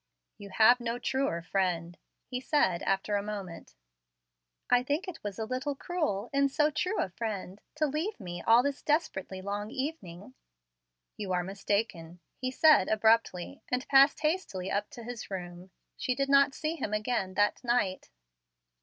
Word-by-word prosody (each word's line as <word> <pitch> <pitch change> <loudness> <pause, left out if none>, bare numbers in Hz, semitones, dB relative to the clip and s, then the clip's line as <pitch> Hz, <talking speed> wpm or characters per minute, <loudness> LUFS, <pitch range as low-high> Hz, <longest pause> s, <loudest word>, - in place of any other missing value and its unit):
"You 200 -1 -9
have 225 +5 +5
no 235 0 -2
truer 245 -10 -1
friend," 175 -2 -1 0.3
he 250 -1 -5
said, 190 - +2
after 195 +2 0
a - - -1
moment. 195 - -7 0.9
"I 245 0 +4
think 290 +8 -2
it 340 -3 -8
was 205 -2 -5
a 220 - -2
little 255 +4 -3
cruel, 275 - -2
in 280 0 +3
so 300 +2 +2
true 365 +7 -1
a - - 0
friend, 200 -1 -5
to 305 0 +1
leave 310 +8 -2
me 175 -3 -6
all 230 +2 +5
this 285 0 -2
desperately 190 - -1
long 205 +1 -3
evening." 225 - -5 0.8
"You 195 -3 -3
are 180 0 +1
mistaken," 190 -3 -2 0.2
he 255 - -3
said, 300 -5 +5
abruptly, 220 +1 +2
and 250 +1 -1
passed 275 +1 +6
hastily 300 - -1
up 205 +1 -1
to 245 -5 -10
his 240 0 -7
room. 180 -1 -7 0.3
She 255 - -1
did 275 +1 -1
not 275 0 +5
see 315 +2 -2
him 215 -7 -2
again 210 -4 -1
that 205 +4 +1
night. 235 -6 0
225 Hz, 165 wpm, -30 LUFS, 190-275 Hz, 0.9 s, passed